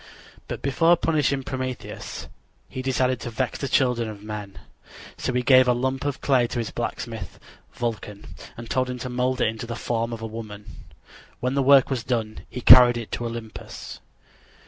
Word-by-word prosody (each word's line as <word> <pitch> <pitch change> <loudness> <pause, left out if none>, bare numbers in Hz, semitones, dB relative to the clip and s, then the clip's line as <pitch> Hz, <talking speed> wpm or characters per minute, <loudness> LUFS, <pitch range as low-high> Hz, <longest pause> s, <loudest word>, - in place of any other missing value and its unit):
But - - -6
before 165 +6 +4
punishing 150 -5 +1
Prometheus 130 -1 -5 0.4
he 130 - -6
decided 130 -1 +1
to 120 - -5
vex 120 +2 -2
the 140 - -2
children 125 -4 +1
of 105 -1 -9
men. 105 -2 -7 0.6
So - - -2
he 125 0 0
gave 130 0 +6
a 125 - +5
lump 130 +2 -2
of 145 -2 -2
clay 130 -4 +3
to 120 - -5
his 115 -2 -2
blacksmith, 115 -5 -5 0.4
Vulcan, 105 -3 -4 0.3
and 115 0 -8
told 130 +1 0
him 125 - -4
to 125 +1 -5
mold 125 +1 0
it - - +4
in 110 0 -3
the 115 +1 -5
form 115 0 -2
of 115 -1 -6
a - - -2
woman. 110 -2 -8 0.7
When 125 +1 -1
the 140 - +2
work 135 0 +6
was 125 -3 -1
done 110 -4 -3
he 125 - -6
carried 125 0 +9
it 115 -2 -6
to 120 - -3
Olympus. 115 -2 -8
125 Hz, 185 wpm, -24 LUFS, 115-130 Hz, 0.7 s, carried